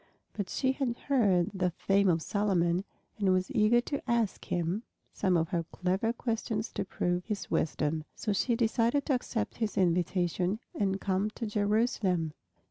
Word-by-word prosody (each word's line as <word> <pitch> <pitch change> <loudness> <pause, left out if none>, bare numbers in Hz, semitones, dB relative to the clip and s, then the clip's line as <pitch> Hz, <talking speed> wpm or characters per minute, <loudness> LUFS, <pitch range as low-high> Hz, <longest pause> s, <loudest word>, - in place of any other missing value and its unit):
But 200 -3 -4
she 260 - +1
had 260 -3 -2
heard 200 -11 +2
the 185 -2 +1
fame 195 +3 +2
of 165 -2 +2
Solomon 185 -3 +1 0.3
and 195 -2 +3
was 185 0 +1
eager 215 +3 +4
to 285 +3 -3
ask 235 -4 0
him 175 +4 -1 0.3
some 185 -3 +2
of 165 0 0
her 170 -3 0
clever 190 +5 0
questions 225 -2 -2
to - - -2
prove 180 -1 -1
his 210 -2 -4
wisdom. 155 0 0
So 215 - -1
she 235 +4 +1
decided 235 +4 +2
to 285 - +1
accept 225 -3 -2
his 220 -3 -2
invitation 180 +2 +1
and 195 -1 0
come 195 +1 0
to 230 - -3
Jerusalem. 205 -6 +1
200 Hz, 160 wpm, -30 LUFS, 180-225 Hz, 0.3 s, eager